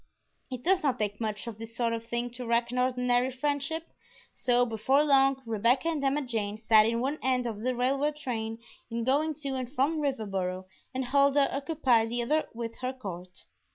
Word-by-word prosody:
It 255 Hz, -2 st, -6 dB
does 375 Hz, +1 st, +3 dB
not 275 Hz, -4 st, +1 dB
take 205 Hz, 0 st, -3 dB
much 215 Hz, -1 st, -2 dB
of 225 Hz, -2 st, -7 dB
this 225 Hz, 0 st, -8 dB
sort 235 Hz, -1 st, 0 dB
of 230 Hz, 0 st, -3 dB
thing 240 Hz, +1 st, -2 dB
to 245 Hz, 0 st, -7 dB
wreck 235 Hz, +1 st, +1 dB
an 250 Hz, -, -1 dB
ordinary 250 Hz, 0 st, +2 dB
friendship, 285 Hz, +4 st, -2 dB, 0.5 s
so 245 Hz, -1 st, +2 dB
before 245 Hz, +5 st, +2 dB
long 270 Hz, -2 st, +3 dB
Rebecca 230 Hz, +7 st, +2 dB
and 310 Hz, -4 st, -2 dB
Emma 280 Hz, +2 st, +1 dB
Jane 215 Hz, -4 st, -3 dB
sat 220 Hz, -1 st, +5 dB
in 230 Hz, +1 st, 0 dB
one 280 Hz, +4 st, -1 dB
end 255 Hz, -1 st, +1 dB
of 225 Hz, -3 st, -4 dB
the 255 Hz, +2 st, 0 dB
railway 275 Hz, +4 st, +1 dB
train 225 Hz, -6 st, -4 dB, 0.3 s
in 230 Hz, 0 st, -2 dB
going 295 Hz, +5 st, +1 dB
to 280 Hz, -1 st, -4 dB
and 255 Hz, -2 st, -3 dB
from 300 Hz, +3 st, +1 dB
Riverboro, 195 Hz, -9 st, -2 dB, 0.3 s
and 260 Hz, -1 st, -2 dB
Huldah 280 Hz, +1 st, +3 dB
occupied 275 Hz, -6 st, +2 dB
the 240 Hz, +1 st, -1 dB
other 305 Hz, +6 st, +1 dB
with 230 Hz, -1 st, -5 dB
her 255 Hz, 0 st, -2 dB
court. 185 Hz, -7 st, -8 dB
250 Hz, 190 wpm, -29 LUFS, 230-275 Hz, 0.5 s, sat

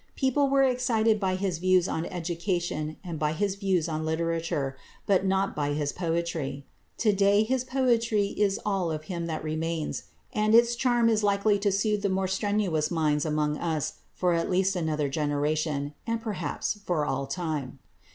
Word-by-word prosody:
People 275 Hz, +1 st, +2 dB
were 275 Hz, 0 st, +4 dB
excited 230 Hz, -4 st, +2 dB
by 190 Hz, -2 st, 0 dB
his 185 Hz, -3 st, -2 dB
views 185 Hz, 0 st, +3 dB
on 160 Hz, +1 st, -2 dB
education 170 Hz, -3 st, -2 dB
and 170 Hz, -4 st, -5 dB
by 150 Hz, 0 st, +1 dB
his 200 Hz, +3 st, 0 dB
views 190 Hz, -4 st, 0 dB
on 155 Hz, -1 st, -2 dB
literature, 160 Hz, -4 st, -1 dB, 0.3 s
but 195 Hz, -1 st, +2 dB
not 195 Hz, +1 st, +1 dB
by 145 Hz, -1 st, 0 dB
his 145 Hz, -1 st, -1 dB
poetry. 165 Hz, -5 st, -2 dB, 0.3 s
To 215 Hz, -3 st, +3 dB
day 200 Hz, +1 st, +4 dB
his 255 Hz, +3 st, 0 dB
poetry 235 Hz, -6 st, +1 dB
is 200 Hz, -1 st, +1 dB
all 195 Hz, -4 st, 0 dB
of 155 Hz, -1 st, -4 dB
him 170 Hz, 0 st, -4 dB
that 160 Hz, -2 st, -3 dB
remains, 160 Hz, 0 st, -3 dB, 0.3 s
and 215 Hz, +1 st, +3 dB
its 235 Hz, 0 st, +5 dB
charm 240 Hz, -1 st, +2 dB
is 220 Hz, -2 st, +3 dB
likely 205 Hz, 0 st, +2 dB
to 200 Hz, 0 st, +1 dB
soothe 210 Hz, +1 st, +1 dB
the 200 Hz, -, +1 dB
more 190 Hz, 0 st, 0 dB
strenuous 190 Hz, -5 st, 0 dB
minds 155 Hz, -3 st, +1 dB
among 150 Hz, -1 st, 0 dB
us 160 Hz, -4 st, -2 dB, 0.2 s
for 180 Hz, -1 st, +1 dB
at 165 Hz, 0 st, 0 dB
least 190 Hz, +1 st, +2 dB
another 155 Hz, -4 st, 0 dB
generation, 145 Hz, 0 st, -1 dB
and 230 Hz, 0 st, 0 dB
perhaps 205 Hz, -2 st, -3 dB
for 165 Hz, -6 st, 0 dB
all 135 Hz, -1 st, -2 dB
time. 150 Hz, -4 st, -3 dB
180 Hz, 170 wpm, -27 LUFS, 155-205 Hz, 0.3 s, its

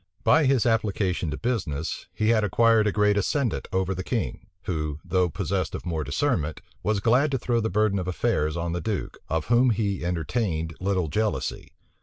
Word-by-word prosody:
By 160 Hz, 0 st, +5 dB
his 130 Hz, -3 st, +3 dB
application 100 Hz, -7 st, 0 dB
to 75 Hz, -, -3 dB
business, 95 Hz, -, -2 dB
he 110 Hz, -, 0 dB
had 110 Hz, -2 st, +4 dB
acquired 110 Hz, +2 st, +4 dB
a -, -, +2 dB
great 105 Hz, 0 st, +2 dB
ascendant 120 Hz, +3 st, 0 dB
over 95 Hz, 0 st, 0 dB
the 95 Hz, 0 st, -4 dB
king; -, -, -3 dB, 0.2 s
who, 75 Hz, -4 st, -2 dB
though 90 Hz, -1 st, +2 dB
possessed 90 Hz, -1 st, -2 dB
of -, -, -7 dB
more 80 Hz, -3 st, -2 dB
discernment, 75 Hz, -, -1 dB, 0.2 s
was 105 Hz, -1 st, 0 dB
glad 125 Hz, +8 st, +3 dB
to 135 Hz, -, 0 dB
throw 120 Hz, -1 st, 0 dB
the 110 Hz, -, -1 dB
burden 100 Hz, 0 st, +2 dB
of 90 Hz, -, -4 dB
affairs 80 Hz, -3 st, 0 dB
on 85 Hz, 0 st, -2 dB
the 85 Hz, -, -2 dB
duke, 105 Hz, +2 st, -3 dB
of 80 Hz, -1 st, -1 dB
whom 120 Hz, +2 st, +4 dB
he 100 Hz, -4 st, 0 dB
entertained 85 Hz, -, -1 dB
little 95 Hz, -3 st, 0 dB
jealousy. 110 Hz, +8 st, -2 dB
100 Hz, 185 wpm, -26 LUFS, 85-115 Hz, 0.2 s, By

